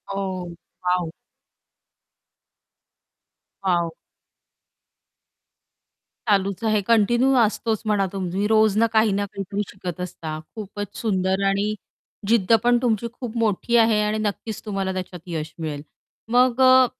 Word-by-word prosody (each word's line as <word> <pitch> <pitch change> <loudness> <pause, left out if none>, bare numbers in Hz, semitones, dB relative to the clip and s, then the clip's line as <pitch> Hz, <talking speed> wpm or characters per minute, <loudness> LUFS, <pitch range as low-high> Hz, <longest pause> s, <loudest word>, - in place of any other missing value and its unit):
ओह, 190 -2 -3 0.4
wow! 180 -2 +1 2.5
Wow! 175 -3 +1 2.4
चालूच 200 0 +1
आहे 215 -2 +2
continue 240 +4 +4
असतोच 220 0 +1
म्हणा, 205 -2 +2
तुम्ही 190 +1 -1
रोज 215 -1 +4
ना 230 +1 +4
काही 220 -1 +4
ना 200 +1 0
काहीतरी 200 0 -4
शिकत 185 -2 -6
असता. 160 -3 -5 0.2
खूपच 205 -2 -6
सुंदर 190 -3 0
आणि 200 +2 +1 0.5
जिद्द 230 -2 +3
पण 240 0 +4
तुमची 235 -2 +1
खूप 240 -2 -6
मोठी 225 +1 +1
आहे 225 -2 +4
आणि 210 +1 0
नक्कीच 215 0 -3
तुम्हाला 195 -2 -2
त्याच्यात 185 -2 -6
यश 160 -2 -4
मिळेल. 150 -3 -4 0.5
मग 250 +1 +4
अ, 260 0 +7
205 Hz, 115 wpm, -23 LUFS, 185-225 Hz, 2.5 s, अ